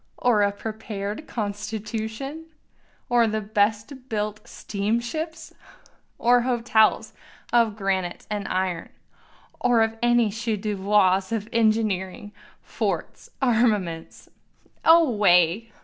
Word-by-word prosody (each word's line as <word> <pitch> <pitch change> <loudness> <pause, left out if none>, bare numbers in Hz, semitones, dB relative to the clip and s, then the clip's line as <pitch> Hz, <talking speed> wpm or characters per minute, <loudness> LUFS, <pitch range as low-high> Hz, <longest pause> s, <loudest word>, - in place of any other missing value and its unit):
or 235 -4 +2
a 200 0 +3
prepared 215 +3 -6
constitution? 220 +7 -5 0.6
or 240 -1 +3
the 215 0 -1
best 210 +3 0 0.2
built 210 -1 -2
steamships? 235 +13 -3 0.6
Or 245 +1 +4
hotels 235 -3 +2 0.4
of 230 -3 +3
granite 190 -3 -2
and 205 -1 -4
iron? 185 -2 -2 0.7
or 225 -2 +2
any 240 -2 +3
chef 220 0 -2
d'oeuvres 195 -2 +2
of 220 -2 -2
engineering, 215 -3 0 0.3
forts, - - -4
armaments? 215 -9 0 0.6
Away! 210 - +4
215 Hz, 90 wpm, -24 LUFS, 200-235 Hz, 0.7 s, Or